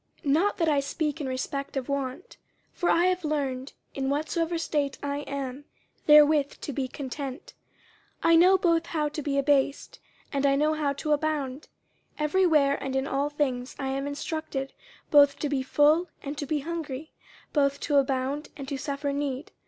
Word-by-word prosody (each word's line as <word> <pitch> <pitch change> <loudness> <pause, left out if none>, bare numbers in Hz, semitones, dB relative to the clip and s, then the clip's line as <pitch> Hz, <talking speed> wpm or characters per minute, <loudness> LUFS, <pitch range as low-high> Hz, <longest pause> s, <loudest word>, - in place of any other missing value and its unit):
50:004:011 280 - +1
Not 380 +7 +2
that 330 -4 +1
I 290 -2 +3
speak 300 +2 -2
in 280 - -3
respect 275 +2 -3
of 260 - -3
want: 280 +3 -4 0.4
for 350 - 0
I 340 +1 +4
have 365 -1 +1
learned, 275 -3 -2 0.2
in 270 -1 -2
whatsoever 325 +4 -1
state 295 -4 -1
I 285 0 -2
am, 275 0 -5 0.4
therewith 300 -1 +6
to 290 - -4
be 260 0 -2
content. 270 +1 -6 0.7
50:004:012 330 - +4
I - - +7
know 365 +3 +6
both 335 -2 +2
how 300 -2 -1
to 300 +1 -5
be 280 -1 -1
abased, 280 0 +1 0.3
and 280 0 +2
I 275 - +3
know 305 +2 +2
how 300 -2 0
to 300 +2 -3
abound: 295 -2 -2 0.5
every 330 +5 +2
where 285 -4 +3
and 265 -1 -3
in 265 0 +1
all 280 +1 0
things 265 -4 -2
I 270 -2 -3
am 275 +1 -2
instructed 285 -2 -4 0.4
both 285 -1 +6
to 295 - -2
be 275 -2 0
full 300 +6 +3
and 280 +1 -4
to 290 -1 -5
be 300 0 0
hungry, 315 -2 -5 0.4
both 280 -1 +2
to 290 - +1
abound 270 +2 0
and 275 -2 -7
to 280 - -2
suffer 280 0 -2
need. 280 0 -3
285 Hz, 185 wpm, -27 LUFS, 275-310 Hz, 0.7 s, I